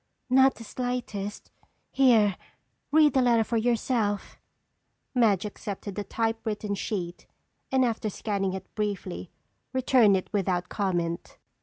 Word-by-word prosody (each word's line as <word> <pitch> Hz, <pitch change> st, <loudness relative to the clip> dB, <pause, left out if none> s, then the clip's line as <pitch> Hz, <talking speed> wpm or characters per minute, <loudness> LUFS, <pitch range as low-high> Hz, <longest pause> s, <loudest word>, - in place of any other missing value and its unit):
"Not 265 Hz, +1 st, +6 dB
the 230 Hz, -, -10 dB
slightest. 230 Hz, -4 st, -4 dB, 0.4 s
Here, 230 Hz, -7 st, +4 dB, 0.6 s
read 300 Hz, -2 st, +5 dB
the 265 Hz, -, +4 dB
letter 235 Hz, -2 st, +4 dB
for 230 Hz, +1 st, -1 dB
yourself." 225 Hz, -2 st, 0 dB, 0.7 s
Madge 220 Hz, -7 st, +3 dB
accepted 205 Hz, -1 st, -6 dB
the 205 Hz, -, -3 dB
typewritten 220 Hz, -1 st, -2 dB
sheet 185 Hz, -3 st, -4 dB, 0.4 s
and 260 Hz, -1 st, +4 dB
after 225 Hz, -2 st, -1 dB
scanning 195 Hz, -2 st, -2 dB
it 190 Hz, -1 st, -8 dB
briefly, 200 Hz, -4 st, -3 dB, 0.4 s
returned 250 Hz, -6 st, +4 dB
it 185 Hz, -, -7 dB
without 185 Hz, -3 st, 0 dB
comment. 175 Hz, -4 st, -2 dB
215 Hz, 120 wpm, -27 LUFS, 195-245 Hz, 0.7 s, Not